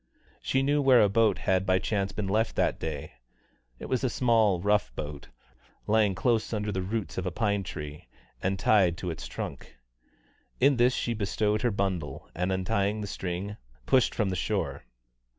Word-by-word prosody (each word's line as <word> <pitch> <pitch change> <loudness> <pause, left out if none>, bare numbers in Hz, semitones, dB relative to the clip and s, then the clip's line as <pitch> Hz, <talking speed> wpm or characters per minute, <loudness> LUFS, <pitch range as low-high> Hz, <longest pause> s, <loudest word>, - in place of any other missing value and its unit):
She 135 0 +1
knew 145 +1 +2
where 130 -4 +6
a 105 - +3
boat 110 -1 +3
had 95 0 +1
by 95 -1 +3
chance 100 0 -1
been 100 +1 -3
left 110 +3 0
that - - +1
day; 75 -2 -5 0.7
it - - -8
was 130 0 -1
a 130 - +2
small 110 -6 +3
rough 100 -8 +1
boat, 75 -1 -6 0.6
lying 105 -2 +3
close 115 +2 +1
under 105 -1 -1
the 95 -1 -2
roots 100 +1 -3
of 95 - -3
a - - -1
pine 100 +1 0
tree, 75 -5 -7 0.3
and 95 +1 0
tied 95 -5 +3
to 90 -1 -3
its 80 - -7
trunk. - - -7 0.8
In 135 0 +4
this 125 +1 +4
she 120 - -1
bestowed 105 0 0
her 120 - +2
bundle, 95 -9 -3
and 90 +2 -1
untying 100 +2 0
the - - -3
string, 95 +2 -4 0.3
pushed 130 -2 +3
from 105 -4 +1
the - - -1
shore. 70 -5 -2
100 Hz, 180 wpm, -28 LUFS, 95-110 Hz, 0.8 s, where